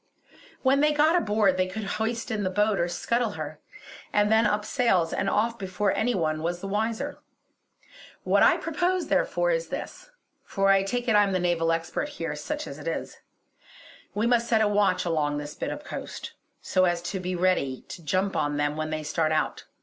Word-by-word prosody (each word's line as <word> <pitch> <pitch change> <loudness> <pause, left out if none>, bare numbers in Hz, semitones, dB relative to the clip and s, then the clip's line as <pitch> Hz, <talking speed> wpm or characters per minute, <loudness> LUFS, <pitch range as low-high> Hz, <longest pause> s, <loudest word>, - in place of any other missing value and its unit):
When 270 +1 +4
they 300 +1 +4
got 305 +3 +4
aboard 210 - +2
they 185 0 +1
could 205 +4 -5 0.2
hoist 230 +2 -2
in 215 -2 -1
the 185 - 0
boat 210 +1 +1
or 170 - +1
scuttle 235 +5 -1
her; - - -6 0.5
and 210 +1 +2
then, 220 0 +5
up 210 0 0
sails 215 -10 +1
and 195 - 0
off 230 +3 0
before 195 +1 0
any 245 +2 0
one 155 -3 0
was 175 +2 -2
the 195 - -6
wiser. 225 +7 -2 1.0
What - - +3
I - - +6
propose, 350 +2 -1
therefore, - - +1
is - - 0
this, - - -7 0.3
for 195 -1 0
I 195 0 +5
take 240 +6 -2
it 220 - +3
I'm 205 -2 +4
the 185 - +1
naval 170 -2 +1
expert 165 - -2
here 165 - -4
such 295 - -4
as - - -8
it - - -8
is. - - -4 1.0
We 210 +2 +1
must 235 -1 +2
set 225 - +3
a - - +3
watch 205 -3 +2
along 150 -3 0
this 145 0 -5
bit - - -4
of - - -6
coast, - - -7 0.3
so 185 0 +2
as 175 -1 0
to 190 +2 -3
be 180 0 -3
ready 175 -8 0
to 175 - -8
jump 190 +5 0
on 145 -1 0
them 145 0 0
when 155 0 -3
they 155 0 -3
start 155 +1 0
out. 155 - -1
200 Hz, 205 wpm, -26 LUFS, 175-235 Hz, 1.0 s, I